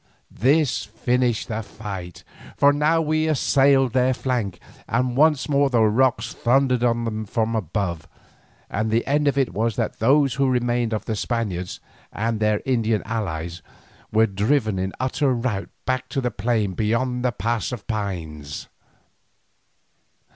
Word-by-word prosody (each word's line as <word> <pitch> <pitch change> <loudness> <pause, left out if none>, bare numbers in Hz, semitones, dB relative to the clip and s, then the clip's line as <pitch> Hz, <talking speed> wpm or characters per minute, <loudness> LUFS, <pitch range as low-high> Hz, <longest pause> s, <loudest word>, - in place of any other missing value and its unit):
This 140 +4 +2
finished 120 +1 0
the 110 0 -3
fight, 100 -5 -8 0.3
for 140 0 +5
now 155 +3 +2
we 155 +1 +1
assailed 135 -3 +3
their 130 0 +3
flank, 120 -9 -2 0.3
and 125 +1 0
once 150 -1 +3
more 140 -1 +3
the 120 -4 +3
rocks 125 +4 +2
thundered 125 0 +2
on 120 -1 +2
them 110 -1 -3
from 110 +2 -1
above, 90 -4 -2 0.6
and 110 +2 -2
the 115 +2 +1
end 145 +1 +1
of 140 - +1
it 135 -3 +1
was 115 +1 0
that - - -2
those 135 +3 +4
who 135 0 +1
remained 120 -2 0
of 110 - -2
the 110 - -2
Spaniards 105 -6 -3 0.3
and 115 0 -2
their 105 -1 +1
Indian 115 -5 +1
allies 85 -6 -4 0.5
were 110 +1 +4
driven 105 +1 0
in 95 +1 -2
utter 130 +1 +1
rout 115 -5 -2 0.2
back 130 0 -1
to - - -2
the 125 -2 -1
plain 105 -2 0
beyond 125 +5 0
the 125 - +2
Pass 115 +3 -2
of 120 -5 -6
Pines. 80 -9 -5
115 Hz, 150 wpm, -23 LUFS, 105-130 Hz, 0.6 s, for